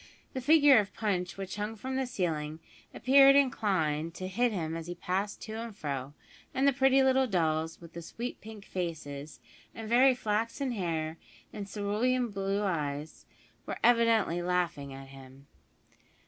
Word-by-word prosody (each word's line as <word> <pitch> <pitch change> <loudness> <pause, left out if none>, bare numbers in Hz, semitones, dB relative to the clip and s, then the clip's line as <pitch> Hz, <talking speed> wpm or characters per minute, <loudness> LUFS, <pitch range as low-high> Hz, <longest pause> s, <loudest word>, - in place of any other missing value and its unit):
The 260 - -3
figure 290 -2 +6
of 200 -2 -3
Punch 185 -5 -2
which 195 +1 -6
hung 210 +2 -3
from 260 +5 -5
the 265 -1 -1
ceiling 160 -9 -2 0.3
appeared 275 +1 +6
inclined 170 - +1
to 185 - -5
hit 235 +6 +1
him 165 -5 -3
as 165 0 -6
he 175 - -5
passed 195 +3 -3
to 220 - -7
and 230 -3 -7
fro, 140 -4 -4 0.4
and 270 +2 +3
the 280 - +4
pretty 270 0 +4
little 265 0 +3
dolls 160 -4 0
with 170 -1 -13
the 170 - -7
sweet 235 +8 -6
pink 215 -2 -11
faces, 155 -5 -5 0.4
and 225 -1 -7
very 255 +3 +5
flaxen 230 +4 -1
hair 165 -6 -3 0.3
and 205 -2 -6
cerulean 220 +4 0
eyes 175 -7 -2 0.4
were - - -4
evidently 230 -7 +3
laughing 175 -6 -1
at 135 0 -10
him. 135 0 -14
195 Hz, 155 wpm, -30 LUFS, 160-240 Hz, 0.4 s, figure